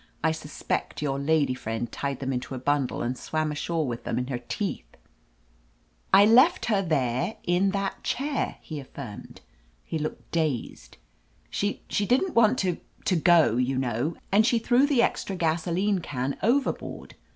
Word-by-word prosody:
"I 160 - +3
suspect 155 -1 -4
your 140 -2 -1
lady 145 -1 +2
friend 115 -1 -4
tied 140 -2 -3
them 135 0 -1
into 125 +1 -4
a - - -4
bundle 140 +1 0
and 125 +2 -1
swam 155 +3 -2
ashore 160 +2 -1
with 120 -3 -4
them - - -2
in 125 - 0
her 125 -3 -2
teeth 120 - -5 0.6
!" - - -37 0.3
"I 200 +1 +8
left 260 - +5
her 210 -4 +2
there 155 - 0
in 180 +3 +2
that 195 0 -3
chair!" 280 0 -1
he 155 -2 -6
affirmed. 130 -5 -9 0.4
He 160 - -3
looked 155 +1 -5
dazed. 140 - -2 0.5
"She 205 +1 -2
— - - -34
^she 205 - +1
didn^t 295 +9 +2
want 230 +1 +4
to 180 -6 0
— - - -31
^to 175 -5 +1
go, 170 -9 +5
you 130 +1 +1
know, 130 +5 -1 0.2
and 205 +3 +5
she 235 +1 +3
threw 245 +4 +3
the 265 -5 +3
extra 195 - -1
gasoline 175 +4 0
can 135 -4 -3
overboard. 260 +6 -1
160 Hz, 175 wpm, -26 LUFS, 130-200 Hz, 0.6 s, I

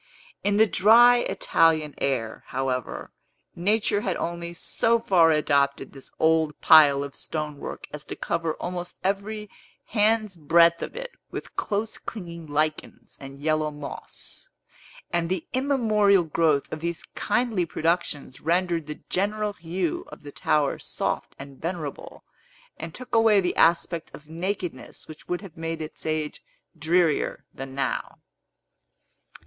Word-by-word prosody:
In 205 0 +2
the 220 - +7
dry 235 +5 +6
Italian 160 -9 +2
air, 120 -5 -2
however, 130 -1 -3 0.4
Nature 205 +3 +1
had 190 -4 -1
only 170 0 -4
so 225 +6 +1
far 180 -7 +4
adopted 140 -3 +1
this 135 -1 -12
old 160 -1 +2
pile 145 -3 +7
of 140 -1 -7
stonework 150 -2 -5
as 150 -1 -6
to - - -6
cover 165 -1 -2
almost 175 0 -5
every 210 +2 -2 0.4
hand's 215 -3 +2
breadth 170 +2 +4
of - - -5
it - - -6 0.2
with - - -7
close 210 +2 -2
clinging 170 -6 -8
lichens 155 +1 -2
and 135 0 -9
yellow 155 +1 +1
moss; 145 -1 -10 0.6
and 170 -1 +1
the 185 -2 -2
immemorial 220 -8 +3
growth 155 -2 +1
of 155 - -4
these 170 +1 -3
kindly 230 -8 0
productions 160 -5 -2
rendered 170 -2 0
the 150 - -7
general 210 +2 -1
hue 175 -1 -3
of - - -12
the 145 - -9
tower 145 0 +1
soft - - -3
and 135 0 -11
venerable, 165 -4 -5 0.5
and 160 0 -8
took 255 -1 -10
away 225 -3 +5
the 180 -2 0
aspect 170 0 +2
of 150 - -15
nakedness 175 -3 -5
which 155 -1 -12
would 180 - -2
have 195 -6 -11
made 165 0 -4
its 155 0 -6
age 155 -1 -2 0.4
drearier 165 0 +1
than 135 0 -8
now. 140 - -2
165 Hz, 135 wpm, -25 LUFS, 150-200 Hz, 0.6 s, the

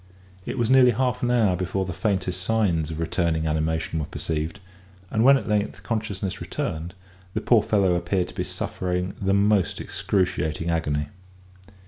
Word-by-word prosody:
It 120 - -3
was 120 0 +1
nearly 130 -1 +7
half 125 +1 0
an 120 - +1
hour 110 -7 +3
before 95 +2 -2
the 90 - -4
faintest 95 -4 -1
signs 90 -7 +1
of 80 0 -5
returning 80 -1 0
animation 80 +1 -1
were 75 - -3
perceived; 80 +4 -3 0.5
and 110 - +2
when 135 +2 +7
at - - -6
length 105 -1 -1
consciousness 105 -4 -3
returned, 85 +3 -4 0.4
the - - +1
poor 120 -3 +4
fellow 100 -3 +2
appeared 90 +1 0
to - - -11
be - - -2
suffering 90 +1 -3
the 95 0 +2
most 100 -1 +2
excruciating 85 -4 -1
agony. 75 -3 -1
95 Hz, 160 wpm, -24 LUFS, 80-110 Hz, 0.5 s, nearly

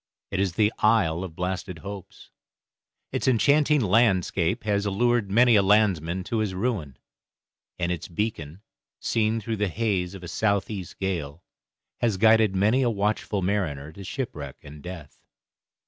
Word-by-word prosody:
It 95 - -1
is 95 -3 0
the 105 +4 +2
Isle 100 -6 +2
of 85 -4 -8
Blasted 90 0 -3
Hopes. 100 +2 -10 0.8
Its - - -2
enchanting 145 +4 +4
landscape 100 -2 +2
has 100 -1 0
allured 115 +1 +1
many 120 +3 +5
a 100 - +6
landsman 95 -4 +2
to 115 +4 -2
his 105 -4 -1
ruin, 95 - -2 0.8
and 85 0 -1
its 85 -3 -4
beacon, 90 -2 -4 0.4
seen 110 0 0
through 110 +1 -4
the 105 0 0
haze 95 -1 -1
of 95 - -10
a - - -7
south 100 +3 0
east 95 -5 -7
gale, 85 -5 -3 0.6
has 110 -5 +1
guided 110 -1 +4
many 110 +7 +3
a 125 - +2
watchful 105 -2 -1
mariner 80 -7 -2
to 100 +5 -11
shipwreck 90 - -5
and 75 +1 -11
death. 90 -4 -9
100 Hz, 150 wpm, -25 LUFS, 90-110 Hz, 0.8 s, a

